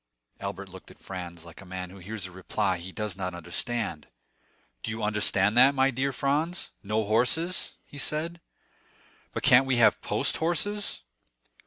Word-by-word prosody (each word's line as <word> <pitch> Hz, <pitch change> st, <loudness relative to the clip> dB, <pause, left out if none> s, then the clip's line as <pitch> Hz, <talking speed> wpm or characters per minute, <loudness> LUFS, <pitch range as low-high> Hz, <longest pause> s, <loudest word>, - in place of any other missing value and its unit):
Albert 100 Hz, 0 st, -5 dB
looked 95 Hz, 0 st, -12 dB
at -, -, -15 dB
Franz 85 Hz, -3 st, -7 dB
like 85 Hz, +2 st, -12 dB
a -, -, -10 dB
man 90 Hz, -1 st, -6 dB
who 100 Hz, -, -12 dB
hears 100 Hz, +2 st, -5 dB
a 90 Hz, -, -6 dB
reply 95 Hz, 0 st, -1 dB
he 90 Hz, +2 st, -8 dB
does 105 Hz, -2 st, -3 dB
not 90 Hz, -2 st, -3 dB
understand. 85 Hz, 0 st, -2 dB, 0.7 s
"Do -, -, -4 dB
you 110 Hz, 0 st, -3 dB
understand 105 Hz, -1 st, +2 dB
that, 135 Hz, +3 st, +7 dB
my 135 Hz, 0 st, +4 dB
dear 135 Hz, +2 st, 0 dB
Franz—no 140 Hz, -, -1 dB
horses?" 125 Hz, -, +2 dB
he 145 Hz, -, -10 dB
said, 165 Hz, +4 st, -2 dB, 0.9 s
"but -, -, -4 dB
can't 135 Hz, +2 st, +7 dB
we 130 Hz, -, +3 dB
have 120 Hz, -2 st, +5 dB
post -, -, +1 dB
horses?" 200 Hz, +6 st, -1 dB
110 Hz, 160 wpm, -28 LUFS, 95-135 Hz, 0.9 s, that